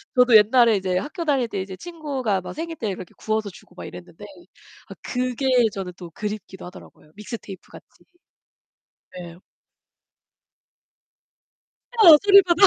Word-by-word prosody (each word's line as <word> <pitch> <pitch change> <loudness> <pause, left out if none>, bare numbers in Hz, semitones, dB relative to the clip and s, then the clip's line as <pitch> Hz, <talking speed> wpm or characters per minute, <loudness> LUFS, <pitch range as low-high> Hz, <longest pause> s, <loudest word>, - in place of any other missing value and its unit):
저도 250 -2 +5
옛날에 230 +2 +4
이제 185 -2 -1
학교 330 - -6
다닐 275 -5 +1
때 205 - -5
이제 190 0 -6
친구가 275 - -4
막 180 - -8
생일 330 +1 -6
때 225 - -4
이렇게 185 -2 -8
구워서 220 -1 -2
주고 185 - -17
막 - - -9
이랬는데 - - -12 0.7
아 - - -8
그게 255 +1 -3 0.3
저는 190 -2 -6
또 175 -2 -11
그립기도 210 -2 -7
하더라고요 175 -4 -15
믹스테이프같이. 210 -3 -11 1.2
네. 170 -1 -10 2.7
어, 330 -6 +10
소리바다. 395 -2 +6
220 Hz, 295 characters per minute, -22 LUFS, 190-290 Hz, 2.7 s, 어